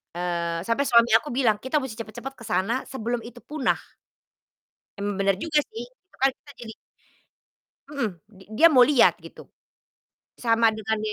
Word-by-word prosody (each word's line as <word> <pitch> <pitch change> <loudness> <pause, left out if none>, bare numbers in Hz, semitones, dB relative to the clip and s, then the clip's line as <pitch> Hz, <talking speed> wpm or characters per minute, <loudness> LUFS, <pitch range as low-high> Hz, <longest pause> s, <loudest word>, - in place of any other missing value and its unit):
eee, 170 -1 -2
sampai 230 +7 0
suami 235 0 +5
aku 300 - -13
bilang, 235 -5 +3
"Kita 260 +6 -4
musti 245 -4 -7
cepat-cepat 230 +5 -7
ke - - -11
sana 210 +8 0
sebelum 240 -1 -3
itu 240 0 -12
punah." 295 -3 0 1.2
Emang 205 0 -2
bener 195 -1 +2
juga 315 -2 +1
sih. 230 +2 -6
Itu 370 +10 -30
kan 270 - +5
kita 290 - -18
jadi 225 -2 -8 1.2
Mhm, 280 -6 -1 0.2
di 190 -3 -17
dia 335 +5 +8
mau 255 -4 +7
lihat 285 -3 +4
gitu. - - -13 1.0
Sama 230 -1 +3
dengan 220 0 -3
235 Hz, 155 wpm, -25 LUFS, 215-265 Hz, 1.2 s, dia